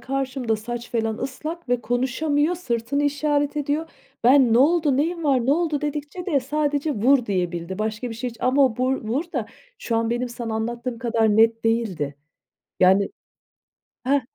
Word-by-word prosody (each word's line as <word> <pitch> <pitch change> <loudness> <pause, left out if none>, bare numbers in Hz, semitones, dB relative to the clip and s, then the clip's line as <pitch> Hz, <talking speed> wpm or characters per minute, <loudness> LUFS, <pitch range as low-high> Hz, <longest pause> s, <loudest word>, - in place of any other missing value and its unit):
karşımda 260 -4 -2
saç 240 +2 -6
falan 225 -1 -1
ıslak 305 +4 -5
ve 245 -1 +1
konuşamıyor, 285 +7 0
sırtını 255 -3 -2
işaret 290 0 0
ediyor. 295 +3 -1 0.3
Ben, 255 -1 +6
"Ne 230 - +5
oldu, 295 -1 +3
neyin 335 +3 -1
var, 260 -4 +2
ne 275 - +4
oldu?" 315 -2 0
dedikçe 300 +4 -4
de 290 -7 +2
sadece 290 +2 -1
"Vur!" 250 +3 +3
diyebildi. 180 -1 -2
Başka 220 +3 -3
bir - - -5
şey 245 +2 -4
hiç 230 - -14
ama 270 +2 +4
o 250 -3 0
bu 255 +1 +1
r - - +2
"vur" 270 +9 0
da 240 -7 -2 0.3
şu 230 - -2
an 230 0 0
benim 245 +1 -1
sana 235 -2 -5
anlattığım 235 +2 -3
kadar 225 -3 +1
net 225 +1 +4
değildi. 205 -11 0 0.7
Yani 190 +2 +5 1.0
Hah, 280 +2 +3
250 Hz, 170 wpm, -23 LUFS, 225-290 Hz, 1.0 s, Ben